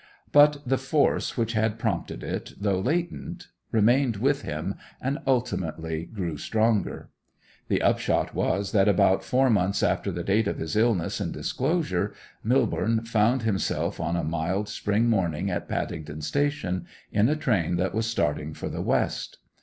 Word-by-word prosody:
But 145 0 +6
the 135 +1 +2
force 135 +2 +1
which 115 -1 0
had 110 0 +1
prompted 115 -2 -2
it, - - -4
though 100 -2 +1
latent, 170 - -2 0.2
remained 120 +2 +3
with 140 +6 +1
him 75 +1 -3 0.3
and 135 +4 -2
ultimately 85 - -1
grew 90 -8 -4
stronger. 110 +4 0 0.6
The - - +1
upshot - - +1
was 100 +1 0
that 100 -2 +4
about 95 -1 +4
four 130 0 +3
months 100 -1 +1
after - - +1
the - - -4
date 105 +2 +2
of - - -2
his 80 -1 -4
illness 110 -6 +1
and - - -2
disclosure, - - -1 0.3
Millborne 115 0 +1
found 115 +3 +2
himself 105 -4 -1
on 85 - -1
a 85 - -1
mild 85 +6 -1
spring 105 +3 0
morning 95 -4 +1
at 90 - -3
Paddington 75 -1 -4
Station, 140 - -1 0.2
in 105 +4 +3
a 150 - +2
train 105 - +1
that 90 +2 0
was 110 +1 0
starting 75 -8 -1
for - - -5
the - - -4
west. - - -1
110 Hz, 155 wpm, -26 LUFS, 90-125 Hz, 0.6 s, But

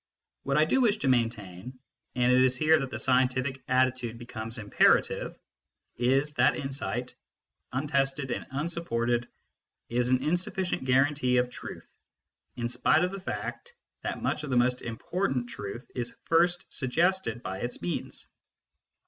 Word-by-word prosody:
What 140 0 0
I 155 - +5
do 265 +11 +2
wish 220 -4 +3
to 145 - -2
maintain 115 -2 -1 0.4
and 125 0 +3
it 125 0 +5
is 130 0 +3
here 155 +3 +5
that 135 - -3
the 110 - -5
scientific 130 +2 +1
attitude 130 -2 +1
becomes 115 -1 -6
imperative 105 -2 +2 0.6
is 135 +5 +2
that 130 -2 +4
insight, 135 0 -3 0.6
untested 135 0 0
and - - -3
unsupported, 120 -6 -1 0.6
is 120 +1 +1
an 130 0 +2
insufficient 180 0 -1
guarantee 130 0 +3
of 125 0 +1
truth, - - -9 0.6
in 120 -1 -2
spite 125 +7 +3
of 180 - 0
the 195 - -5
fact 480 - -5 0.3
that - - -4
much 150 - -1
of 150 - -5
the 125 - +2
most 125 +1 +2
important 125 - -2
truth 100 +5 -6
is 120 -2 -4
first 175 +2 +3
suggested 155 -3 0
by 95 +1 -4
its 120 +2 -4
means. 85 +1 -4
130 Hz, 145 wpm, -28 LUFS, 120-150 Hz, 0.6 s, I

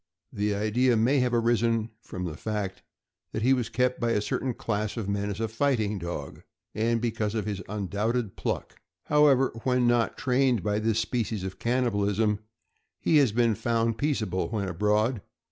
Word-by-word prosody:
The 105 0 0
idea 115 +4 +2
may 125 +6 +3
have 125 -1 +1
arisen 115 -1 +1
from 90 -4 -6
the 80 -3 -4
fact 105 -2 -4 0.5
that 110 - -2
he 130 +3 +5
was 125 -3 -1
kept 125 0 0
by 120 -1 +1
a - - +2
certain 115 +4 -2
class 105 0 -2
of 110 -4 -3
men 100 0 -1
as 100 +1 -4
a 115 - 0
fighting 110 -4 0
dog, 85 -5 -6 0.3
and 115 +2 +1
because 110 -2 -1
of 110 - -1
his 100 -3 -3
undoubted 105 +2 -2
pluck. - - -4 0.2
However, 145 -3 +4
when 125 -1 +2
not 120 -1 +2
trained 125 -4 +2
by 105 0 0
this 110 0 +1
species 115 -3 -1
of 95 0 -6
cannibalism, 105 -4 +1 0.6
he 160 - +3
has 135 -6 +4
been 115 0 +3
found 115 +1 0
peaceable 110 - -1
when 105 -3 -2
abroad. 105 +5 +1
110 Hz, 170 wpm, -27 LUFS, 105-120 Hz, 0.6 s, he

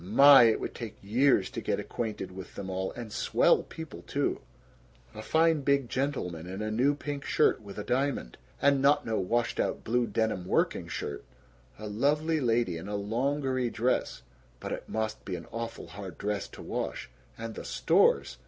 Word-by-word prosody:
My! 135 +7 +8
It 115 - +3
would - - -4
take 115 -3 -7
years 115 -1 +3
to - - -4
get - - -1
acquainted 110 -5 -4
with 95 0 -10
them 95 -1 -5
all. 95 0 -2
And 115 -3 -7
swell - - +3
people, 160 -3 -9
too! 140 0 -1 0.7
A 110 - -7
fine 160 +4 +3
big 140 -2 +1
gentleman 105 - -2
in 95 +2 -6
a 110 - -2
new 130 +6 +2
pink 145 -1 -5
shirt 155 - +2
with 100 -2 -10
a 105 - -3
diamond, 130 - -1 0.2
and 140 -1 +3
not 145 +2 +4
no 110 -1 0
washed 115 +5 0
out - - -1
blue 120 +1 +1
denim 110 -4 -1
working - - +1
shirt. 70 - -5 0.5
A 110 - -8
lovely 150 +9 +1
lady 115 - +1
in 85 - -8
a 105 - -3
longery 130 +4 0
dress 125 +3 -1 0.4
(but - - -6
it - - -5
must 110 0 -3
be 95 - -4
an 85 - -7
awful 115 0 -5
hard 95 -4 -8
dress 105 -1 -2
to - - -11
wash). - - -4 0.3
And 115 0 -5
the - - -7
stores! - - +2
115 Hz, 180 wpm, -29 LUFS, 100-140 Hz, 0.7 s, My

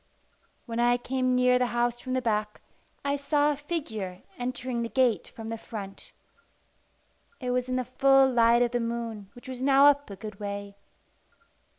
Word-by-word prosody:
When 230 -1 -4
I 240 0 +4
came 255 +1 0
near 250 0 +4
the 250 - +2
house 240 0 +1
from 255 0 -5
the 255 -1 0
back, 210 -2 -1 0.5
I 280 0 +1
saw 290 +1 +2
a - - -1
figure 225 - -5 0.2
entering 245 -1 -3
the 230 - -3
gate 235 -4 +2
from 225 -3 -9
the 225 0 -4
front. 200 -4 -8 1.3
It 250 -3 -2
was 250 0 -1
in 255 - 0
the 255 -1 -1
full 270 +2 +5
light 235 -1 +4
of 240 - 0
the 245 - 0
moon, 230 -3 -4
which 245 - -13
was 255 -1 -6
now 275 +1 +5
up 285 -2 +4
a 200 - -7
good 210 +1 -9
way. 200 -1 -5
245 Hz, 180 wpm, -27 LUFS, 225-260 Hz, 1.3 s, full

